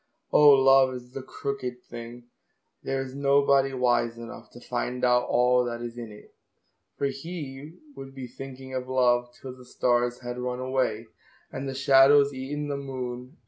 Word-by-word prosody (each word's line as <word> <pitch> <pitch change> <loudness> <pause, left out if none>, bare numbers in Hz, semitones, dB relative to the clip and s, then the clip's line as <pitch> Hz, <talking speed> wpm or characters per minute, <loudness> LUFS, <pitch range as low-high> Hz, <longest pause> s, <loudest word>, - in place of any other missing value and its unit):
Oh, 150 -1 +7
love 135 -1 +5
is 125 0 -10
the 135 - -6
crooked 130 -2 -5
thing, 120 +1 -9 0.6
There 135 0 -2
is 130 -1 -9
nobody 140 0 +3
wise 120 -2 +1
enough 115 0 -10
To 120 - -11
find 125 +1 -3
out 125 0 +3
all 125 +1 +3
that 120 -1 -4
is 120 -1 -6
in 115 -2 -8
it, 105 - -15 0.6
For 140 - -1
he 145 +1 -6 0.2
would 135 0 -10
be 130 -1 -6
thinking 130 +1 -10
of 130 0 -4
love 120 -1 +2
Till 130 -1 -8
the 130 - -15
stars 120 0 0
had 120 0 -6
run 125 0 -3
away, 130 -4 -1 0.5
And 135 0 -5
the 135 - -5
shadows 140 +1 +5
eaten 145 +3 -4
the 140 -1 -3
moon. 130 +1 -6
130 Hz, 170 wpm, -26 LUFS, 125-135 Hz, 0.6 s, Oh